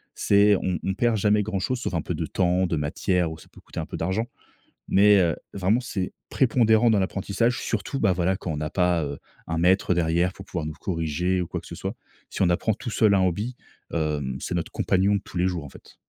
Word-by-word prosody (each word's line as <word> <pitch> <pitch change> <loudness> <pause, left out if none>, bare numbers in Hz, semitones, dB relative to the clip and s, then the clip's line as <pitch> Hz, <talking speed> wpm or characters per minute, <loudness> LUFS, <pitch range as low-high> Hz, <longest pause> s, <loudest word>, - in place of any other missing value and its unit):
C'est 100 +1 +4
on 90 -3 -2
on 95 - 0
perd 120 +2 +2
jamais 105 +1 +3
grand 100 -2 -2
chose 125 +7 -1
sauf 110 - -3
un 85 - 0
peu - - -3
de - - -2
temps, 90 0 +1
de 85 - -1
matière 80 +3 0
ou 80 - -7
ça - - -16
peut - - -16
coûter - - -8
un - - -3
peu - - -6
d'argent, 95 +7 -1 0.6
mais 100 0 +6
heu, 85 -4 +2 0.2
vraiment, 100 +5 +1
c'est 100 -7 -4 0.2
prépondérant 115 -2 +3
dans 110 - +3
l'apprentissage, 100 +5 0
surtout 115 +5 -2
bah 100 -4 +3
voila 90 +2 +1
quand 90 - -4
on 75 - -3
n'a 75 0 -3
pas, 90 -3 +1
heu, 70 -1 -5 0.3
un 80 0 -2
maître 90 +2 +3
derrière 85 +2 +1
pour 95 - -10
pouvoir 80 -5 -4
nous 75 - -5
corriger 90 +1 -1
ou 90 - -2
quoi - - -4
que - - -16
ce - - -8
soit. - - -4 0.4
Si - - -2
on 90 - +4
apprend 100 +5 +1
tout 125 +2 -6
seul 110 -2 +3
un 95 - +3
hobby, 105 +8 -1 0.4
hem, 75 -5 -1
c'est - - -4
notre 85 -2 -3
compagnon 95 +2 +2
de - - -2
tous 90 - -6
les 90 - +2
jours 90 -4 -4
en 70 - -8
fait. - - -16
95 Hz, 240 wpm, -25 LUFS, 85-105 Hz, 0.6 s, mais